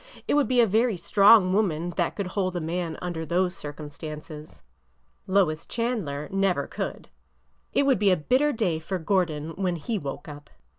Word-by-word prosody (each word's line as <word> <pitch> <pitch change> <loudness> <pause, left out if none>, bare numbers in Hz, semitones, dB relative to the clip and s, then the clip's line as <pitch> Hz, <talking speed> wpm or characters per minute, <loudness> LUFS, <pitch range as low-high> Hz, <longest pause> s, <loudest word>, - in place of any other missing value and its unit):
It - - +1
would 290 -1 +3
be 255 -1 +2
a 235 - +7
very 220 0 +2
strong 200 0 +5
woman 175 -5 0
that 175 0 -1
could 200 -3 -3
hold 185 -2 -1
a - - 0
man 165 0 -3
under 175 -2 -3
those 180 +3 0
circumstances. 150 +1 -9 0.6
Lois 180 -5 +2
Chandler 205 - -3
never 195 -1 +1
could! - - -6 0.6
It 280 - +2
would 270 -7 +3
be 205 -1 +4
a 185 - +4
bitter 260 - +2
day 190 - 0
for 185 +4 -3
Gordon 165 -4 0
when 185 -3 0
he 205 +7 -3
woke 140 -2 -6
up." 145 -1 -10
180 Hz, 170 wpm, -26 LUFS, 155-205 Hz, 0.6 s, a